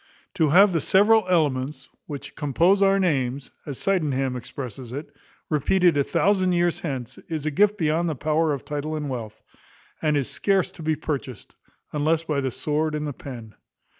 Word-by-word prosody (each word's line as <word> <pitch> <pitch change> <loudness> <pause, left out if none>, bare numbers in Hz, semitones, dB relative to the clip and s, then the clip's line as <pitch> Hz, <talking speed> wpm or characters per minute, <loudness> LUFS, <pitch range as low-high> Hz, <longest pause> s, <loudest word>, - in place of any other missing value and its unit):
To 160 -6 +2
have 190 +5 +6
the 165 - +1
several 210 +3 +4
elements 145 -5 0 0.2
which 145 -3 -7
compose 170 +7 +2
our 195 0 +5
names, 140 -7 0 0.2
as 140 -3 -5
Sydenham 140 -9 0
expresses 125 -1 -7
it, 145 +3 -7 0.3
repeated 170 +3 +3
a 140 - +3
thousand 185 +3 +2
years 175 -1 +1
hence, 130 -7 -5
is 155 -3 -3
a 155 - 0
gift 205 +6 +3
beyond 165 0 +1
the 155 - -2
power 155 +3 +1
of 140 -3 -4
title 150 +1 -3
and 150 -2 -3
wealth; 115 -4 -6 0.6
and 150 -2 +2
is 135 - -1
scarce 195 -3 +1
to - - -12
be 155 0 0
purchased, 140 -7 -5 0.4
unless 155 +2 +1
by 150 -3 -1
the 135 - -1
sword 150 +4 -1
and 150 0 -2
the 145 - -3
pen. 125 -9 -9
150 Hz, 175 wpm, -24 LUFS, 140-175 Hz, 0.6 s, have